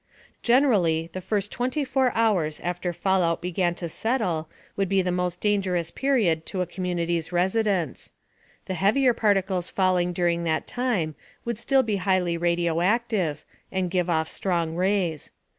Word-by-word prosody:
Generally, 195 - +3
the 185 - -5
first 205 +1 -2
24 260 0 0
hours 190 -10 +1
after 175 0 -2
fallout 175 -1 +1
began 175 0 -1
to 170 - -4
settle 175 -5 -1 0.3
would 195 -2 0
be 195 -1 +2
the 180 - 0
most 180 0 -1
dangerous 185 -5 0
period 215 -13 +1
to 185 - -2
a - - +1
community's 175 -2 -2
residents. 185 - 0 0.5
The 190 - -3
heavier 230 +8 +3
particles 195 -5 +1
falling 185 -2 +1
during 170 -1 0
that 160 -1 0
time 230 -11 -1 0.3
would 235 -2 -3
still 270 +1 +3
be 215 -4 -1
highly 185 -2 +1
radioactive 175 +1 0 0.3
and 185 -2 -1
give 180 -1 0
off 160 -2 +1
strong 170 -4 -1
rays. 180 -4 0
180 Hz, 140 wpm, -25 LUFS, 170-205 Hz, 0.5 s, Generally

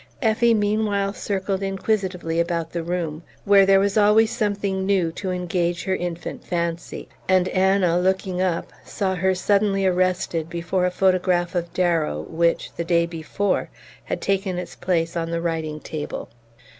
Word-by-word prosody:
Effie 230 +1 +3
meanwhile 205 -1 0
circled 195 -1 -2
inquisitively 190 -4 -1
about 170 -1 -1
the 170 - -2
room, 165 -2 -3 0.2
where 200 -1 +6
there 195 0 +6
was 200 +2 +2
always 215 +2 +5
something 200 -4 -1
new 190 -4 +1
to 190 +3 -5
engage 175 -1 -1
her 190 -1 0
infant 175 -2 -5
fancy; 170 -1 -3 0.2
and 185 -1 +4
Anna, 185 -2 +3
looking 185 0 0
up, 180 -3 -1
saw 190 -2 -2
her 190 +1 +1
suddenly 195 +1 +2
arrested 180 -3 0
before 175 +2 0
a - - +1
photograph 180 -1 +1
of 170 -1 -2
Darrow 165 - +1
which, 170 +1 0
the 170 - -3
day 170 0 +2
before, 170 +4 -2 0.4
had - - -3
taken 195 -2 0
its 180 - -6
place 170 -2 -1
on 165 -1 -2
the 170 0 -1
writing 160 -2 -2
table. 150 -1 -6
185 Hz, 155 wpm, -23 LUFS, 170-195 Hz, 0.4 s, where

